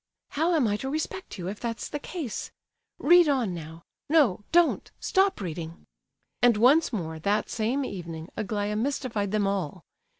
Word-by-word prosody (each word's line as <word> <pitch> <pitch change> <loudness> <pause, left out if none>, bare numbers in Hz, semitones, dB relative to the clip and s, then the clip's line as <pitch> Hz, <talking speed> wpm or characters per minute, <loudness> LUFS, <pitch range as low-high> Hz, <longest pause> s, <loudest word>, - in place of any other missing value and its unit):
"How 330 +4 +1
am 280 -7 +3
I 205 0 +1
to 265 - -4
respect 315 - -4
you, 175 -1 -5
if 205 +2 -5
that's 230 -1 -4
the 295 - -4
case? 290 - -5 0.5
Read 345 0 +6
on 250 -9 +1
now. 165 0 -8 0.3
No—don't! 305 - +3
Stop 385 0 +2
reading!" 170 -3 -6 0.6
And 240 -3 +5
once 275 +9 +5
more, 160 -8 -4
that 200 +5 0
same 240 +5 0
evening, 165 -5 -6
Aglaya 210 -1 -2
mystified 235 -4 -1
them 210 -1 +1
all. 190 -4 -2
215 Hz, 155 wpm, -27 LUFS, 185-285 Hz, 0.6 s, Read